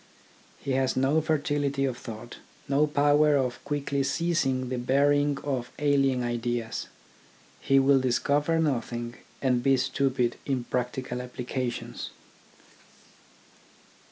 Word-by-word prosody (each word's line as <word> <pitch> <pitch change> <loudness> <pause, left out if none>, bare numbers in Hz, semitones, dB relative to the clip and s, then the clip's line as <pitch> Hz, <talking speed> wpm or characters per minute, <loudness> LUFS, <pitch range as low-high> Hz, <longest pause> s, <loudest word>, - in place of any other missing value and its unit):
He 140 - -4
has 130 0 +1
no 135 +4 +3
fertility 145 -3 0
of 130 -3 -1
thought, 115 0 -9 0.3
no 140 +2 +3
power 145 0 +4
of 125 -2 -2
quickly 140 -1 -1
seizing 135 -3 0
the 125 -1 -2
bearing 145 +3 +2
of 130 -4 -2
alien 135 -3 +2
ideas. 120 -1 -2 0.7
He 135 - +3
will 135 0 +5
discover 145 +5 +1
nothing, 120 -6 -1 0.3
and 125 -2 +2
be 135 +1 +4
stupid 130 -2 0
in 130 -3 -1
practi 125 +1 -2
cal 125 0 -4
applications. 125 0 -4
135 Hz, 115 wpm, -27 LUFS, 125-145 Hz, 0.7 s, will